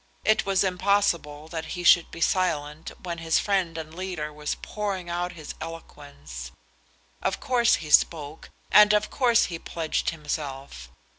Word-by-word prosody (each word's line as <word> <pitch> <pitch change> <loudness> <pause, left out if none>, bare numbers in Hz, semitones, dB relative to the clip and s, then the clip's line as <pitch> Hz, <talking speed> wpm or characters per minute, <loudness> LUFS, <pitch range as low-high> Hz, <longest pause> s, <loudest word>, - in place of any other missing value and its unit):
It 215 -2 +3
was 195 -1 +3
impossible 180 -6 0
that 160 -1 -4
he 175 - -4
should 175 -1 +6
be 170 - -10
silent 155 -5 0
when 170 -2 -4
his 165 -1 +1
friend 185 -5 0
and 155 -1 -7
leader 175 -4 -5
was 150 0 -3
pouring 195 -4 -4
out 175 +1 -2
his 155 -4 -8
eloquence. 140 - -9 0.7
Of - - -1
course 240 -2 +3
he 150 -2 -7
spoke, 150 -1 +2 0.2
and 210 0 +7
of 210 0 0
course 240 -4 +3
he 165 - -4
pledged 165 -2 -2
himself. 140 - -5
165 Hz, 150 wpm, -26 LUFS, 150-190 Hz, 0.7 s, and